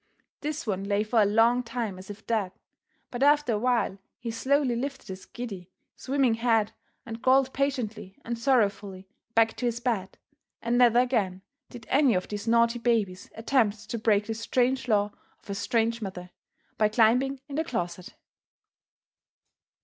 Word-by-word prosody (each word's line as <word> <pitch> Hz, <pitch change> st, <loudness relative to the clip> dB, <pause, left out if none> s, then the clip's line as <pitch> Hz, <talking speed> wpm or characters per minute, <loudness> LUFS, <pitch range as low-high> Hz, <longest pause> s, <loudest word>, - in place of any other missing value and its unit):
This 305 Hz, +1 st, -4 dB
one 195 Hz, -3 st, -2 dB
lay 200 Hz, +1 st, +1 dB
for 220 Hz, +1 st, +2 dB
a -, -, +5 dB
long 230 Hz, +4 st, +4 dB
time 230 Hz, -5 st, -4 dB
as 185 Hz, -, -12 dB
if 205 Hz, +1 st, -10 dB
dead, 210 Hz, -5 st, -1 dB, 0.6 s
but 245 Hz, -, -5 dB
after 290 Hz, -3 st, +4 dB
a 210 Hz, -, 0 dB
while 235 Hz, -5 st, 0 dB, 0.2 s
he 230 Hz, -1 st, -5 dB
slowly 260 Hz, +2 st, +1 dB
lifted 270 Hz, 0 st, -5 dB
his 185 Hz, 0 st, -8 dB
giddy, 195 Hz, -7 st, -7 dB, 0.3 s
swimming 265 Hz, -3 st, +1 dB
head 225 Hz, -2 st, +1 dB, 0.3 s
and 230 Hz, 0 st, -7 dB
crawled 265 Hz, 0 st, +3 dB
patiently 225 Hz, -8 st, -3 dB
and 235 Hz, -, -2 dB
sorrowfully 205 Hz, -6 st, 0 dB, 0.3 s
back 225 Hz, 0 st, +4 dB
to 245 Hz, -, -1 dB
his 235 Hz, 0 st, -2 dB
bed, 225 Hz, -6 st, -2 dB, 0.4 s
and 235 Hz, +1 st, -1 dB
never 240 Hz, -1 st, +5 dB
again 215 Hz, -7 st, +1 dB, 0.3 s
did 235 Hz, -2 st, -11 dB
any 270 Hz, -5 st, +3 dB
of 180 Hz, -, -1 dB
these 205 Hz, +1 st, -5 dB
naughty 235 Hz, +1 st, +3 dB
babies 220 Hz, -6 st, 0 dB
attempt 225 Hz, -3 st, 0 dB
to 235 Hz, -, -2 dB
break 210 Hz, -2 st, +2 dB
this 225 Hz, 0 st, -4 dB
strange 255 Hz, +3 st, 0 dB
law 205 Hz, -2 st, +2 dB, 0.3 s
of -, -, -10 dB
a -, -, -1 dB
strange 230 Hz, +3 st, 0 dB
mother, 185 Hz, -3 st, -7 dB, 0.5 s
by 215 Hz, -1 st, +4 dB
climbing 250 Hz, +5 st, +3 dB
in 280 Hz, -, -9 dB
the 320 Hz, -, +1 dB
closet. 180 Hz, -, -5 dB
230 Hz, 165 wpm, -27 LUFS, 205-250 Hz, 0.6 s, a